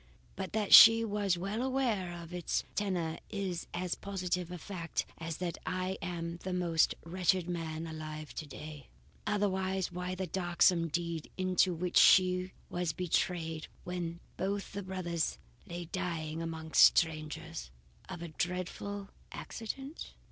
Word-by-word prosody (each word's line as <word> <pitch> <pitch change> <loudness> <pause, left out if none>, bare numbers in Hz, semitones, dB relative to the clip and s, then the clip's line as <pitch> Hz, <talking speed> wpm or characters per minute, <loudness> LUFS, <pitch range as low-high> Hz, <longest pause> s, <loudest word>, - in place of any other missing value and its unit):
But 190 -1 -5
that 210 -2 +1
she 225 0 +11
was 205 -4 +1
well 200 +6 -2
aware 250 -9 0
of 165 +1 -11
its 180 -1 -1
tenor 180 -6 -1
is 190 -5 -3
as 180 0 -2
positive 180 -3 -2
a 180 - -5
fact 170 -1 -3
as 165 -1 -4
that 175 -2 -3
I 185 +1 -2
am 170 -1 -4
the 180 +2 -5
most 170 -3 +2
wretched 180 +1 +1
man 165 -2 -3
alive 155 -1 -6
tonight. 150 -1 -8 0.4
Otherwise, 190 -3 0
why 180 +1 -3
the 190 +1 -2
darksome 175 -1 +3
deed 170 0 -3
into 185 0 +3
which 180 +2 0
she 185 0 +6 0.2
was 175 -2 -2
betrayed 165 -2 -1 0.2
when 175 -1 -4 0.2
both 200 +2 -2
the 200 - -3
brothers 180 -4 -2 0.3
lay 175 0 -5
dying 165 -3 -3
among 160 -1 -5
strangers, 160 - +3 0.4
of 175 -3 -6
a 170 - -5
dreadful 185 +4 -3 0.2
accident?" 270 +7 -6
180 Hz, 135 wpm, -32 LUFS, 165-190 Hz, 0.4 s, she